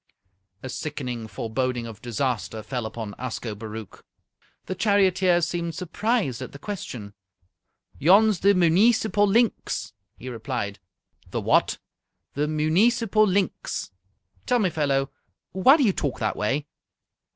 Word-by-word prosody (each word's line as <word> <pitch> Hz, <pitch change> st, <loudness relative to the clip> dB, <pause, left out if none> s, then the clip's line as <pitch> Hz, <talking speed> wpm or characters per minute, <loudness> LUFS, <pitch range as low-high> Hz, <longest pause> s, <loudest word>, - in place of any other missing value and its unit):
A 130 Hz, -, -5 dB
sickening 125 Hz, -6 st, -4 dB
foreboding 120 Hz, +3 st, -2 dB
of 110 Hz, -3 st, -9 dB
disaster 120 Hz, -2 st, -2 dB
fell 120 Hz, +1 st, -3 dB
upon 110 Hz, -2 st, -6 dB
Ascobaruch. 110 Hz, -3 st, -6 dB, 0.6 s
The -, -, -3 dB
charioteer 185 Hz, -2 st, +3 dB
seemed 170 Hz, 0 st, -2 dB
surprised 195 Hz, -, -1 dB
at -, -, -7 dB
the -, -, -8 dB
question. 130 Hz, -, -6 dB, 0.9 s
"Yon's 200 Hz, +5 st, +5 dB
the 200 Hz, +1 st, +4 dB
muneecipal 205 Hz, +4 st, +4 dB
linx," 230 Hz, +3 st, +1 dB, 0.3 s
he 130 Hz, -, -10 dB
replied. 115 Hz, -4 st, -4 dB, 0.5 s
"The -, -, -2 dB
what?" -, -, +2 dB, 0.6 s
"The 145 Hz, +2 st, 0 dB
muneecipal 210 Hz, +8 st, +3 dB
linx." 190 Hz, -, -1 dB, 0.6 s
"Tell 250 Hz, -, +3 dB
me, 195 Hz, -6 st, +1 dB
fellow, 140 Hz, -3 st, 0 dB, 0.4 s
why 255 Hz, -, +6 dB
do 290 Hz, -, +2 dB
you 205 Hz, -6 st, +3 dB
talk 140 Hz, -6 st, -2 dB
that 110 Hz, -, -1 dB
way?" 135 Hz, +8 st, -1 dB
155 Hz, 120 wpm, -25 LUFS, 120-200 Hz, 0.9 s, why